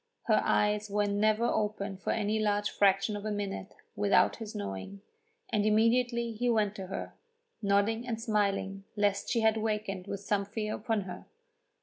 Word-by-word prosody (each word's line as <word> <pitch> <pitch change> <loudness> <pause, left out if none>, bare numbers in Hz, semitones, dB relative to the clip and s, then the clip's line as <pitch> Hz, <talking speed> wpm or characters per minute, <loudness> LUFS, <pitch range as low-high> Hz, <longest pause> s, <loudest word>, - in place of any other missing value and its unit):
Her - - +3
eyes 210 0 +1
were 205 +1 +1
never 215 +3 +2
open 205 -3 -1
for 185 - -6
any 215 0 +1
large 205 -1 +1
fraction 195 +1 +3
of 205 - -5
a 215 - -2
minute 200 -2 -4 0.2
without 205 -2 +3
his 220 -2 -7
knowing, 100 - -5 0.5
and 210 -2 +2
immediately 235 +2 +2
he 240 +2 -1
went 215 -3 +2
to 190 -1 -6
her, 190 - -5 0.5
nodding 210 +4 +1
and 225 -2 -2
smiling 200 -3 0
lest 205 -1 +1
she 230 - +1
had 220 0 +3
wakened 210 -3 -2
with 200 -1 -4
some 200 0 0
fear 215 +1 -3
upon 220 -1 -1
her. 185 -2 -8
210 Hz, 165 wpm, -30 LUFS, 200-220 Hz, 0.5 s, Her